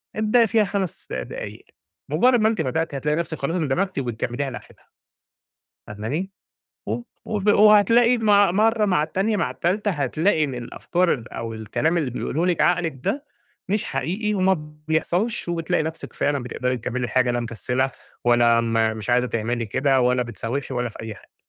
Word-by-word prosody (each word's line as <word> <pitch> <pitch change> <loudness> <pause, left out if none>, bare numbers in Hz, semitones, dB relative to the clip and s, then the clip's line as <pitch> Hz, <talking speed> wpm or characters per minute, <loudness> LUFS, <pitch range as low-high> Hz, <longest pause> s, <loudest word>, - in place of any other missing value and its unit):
ابدأي 220 +2 +3
فيها 220 +1 +3
5 195 -3 -3
دقايق، - - -6 0.4
مجرّد 250 -1 +4
ما 215 - +4
أنتِ 225 - -1
بدأتِ 155 +2 -1
هتلاقي 150 +2 0
نَفْسك 170 -2 -3
خلاص 150 +6 -1
اندمجتِ 175 +2 0
وبتكمّليها 125 +2 -3
لآخرها. - - -12 1.0
فاهماني؟ 130 - -4 0.6
وب 240 - -3 0.2
وب 210 -1 -2
وهتلاقي 215 +4 +6
مع 205 -4 +4
مرّه 215 +2 +3
مع 180 -6 +2
التانية 195 +7 0
مع - - 0
التالتة 205 +4 0
هتلاقي 160 +2 +1
إن 135 -4 -2
الأفكار 170 +8 0
ال 115 -4 -8
أو 115 -1 -5
الكلام 115 +10 -1
اللي 145 -6 0
بيقوله 160 +7 -2
لِك 180 -2 +1
عقلِك 165 -6 +1
ده 285 +1 -2 0.4
مش 210 +1 0
حقيقي 210 +5 -2
وما 190 -1 +3 0.3
بيحصَلش 175 +6 0
وبتلاقي 170 -1 0
نَفْسِك 160 +1 -6
فعلًا 140 -3 0
بتقدَري 125 +1 -2
تكمّلي 125 +2 -3
الحاجة 125 0 +2
لا 120 - 0
مكسّلة 125 +3 -1 0.3
ولا 120 -1 +4
م 115 -1 +1
مش 110 - -6
عايزة 125 +1 +3
تعملي 115 +1 -2
كده، 135 +4 +2
ولا 125 0 +2
بتسوّفي 120 +4 -4
ولا 125 0 -1
في - - -14
أي 110 -1 -6
حاجة. - - -20
155 Hz, 165 wpm, -23 LUFS, 125-200 Hz, 1.0 s, وهتلاقي